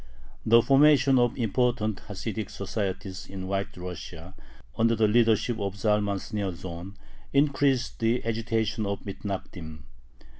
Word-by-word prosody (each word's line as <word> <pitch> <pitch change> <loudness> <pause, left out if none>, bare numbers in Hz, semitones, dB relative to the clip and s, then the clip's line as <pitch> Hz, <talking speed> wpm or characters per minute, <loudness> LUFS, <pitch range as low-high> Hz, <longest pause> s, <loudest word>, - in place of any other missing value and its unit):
The 115 +1 +7
formation 135 -1 +5
of 120 0 +2
important 115 -2 0
Hasidic 110 +1 -4
societies 95 -2 -4
in 95 -1 -6
White 100 0 -3
Russia, 90 -1 -8 0.4
under 115 +1 +3
the 110 -1 +3
leadership 115 +1 +3
of 100 -1 -3
Zalman 105 -1 +1
Shneorsohn, 95 -2 -5 0.4
increased 140 -2 +2
the 115 +2 +1
agitation 110 -1 -1
of 100 0 -3
the 100 - -4
Mithnagdim. 90 -6 -6
105 Hz, 120 wpm, -27 LUFS, 95-115 Hz, 0.4 s, The